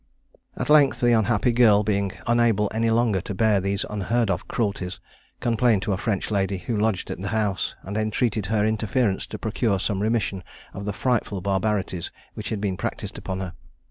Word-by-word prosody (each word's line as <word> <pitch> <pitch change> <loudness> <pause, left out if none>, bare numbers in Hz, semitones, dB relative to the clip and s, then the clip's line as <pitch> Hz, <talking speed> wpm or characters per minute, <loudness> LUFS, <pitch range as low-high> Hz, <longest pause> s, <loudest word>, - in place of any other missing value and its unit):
At - - -1
length 150 -2 +5
the 120 -1 +3
unhappy 115 +1 +3
girl, 110 -4 +5
being 100 -2 0
unable 115 -3 +2
any 115 +1 +1
longer 115 -4 +2
to 100 - -6
bear 105 -1 +3
these 100 +1 -1
unheard 105 +2 0
of - - -3
cruelties, 100 -5 -2 0.4
complained 115 -3 +2
to 105 - 0
a - - -1
French 105 -1 -1
lady 100 -1 0
who 110 +6 -3
lodged 105 -3 0
in - - -5
the 100 - -3
house, 105 -4 -1
and 100 +3 -6
entreated 110 -1 0
her 105 0 +1
interference 110 -1 0
to - - -6
procure 110 -2 0
some 100 0 -1
remission 105 -4 0 0.3
of 100 - -6
the 105 - -1
frightful 115 -3 0
barbarities 95 -2 -1 0.2
which - - -5
had 110 - -2
been 100 -3 -1
practised - - -4
upon 95 0 -4
her. 90 -2 -5
105 Hz, 185 wpm, -24 LUFS, 100-115 Hz, 0.4 s, length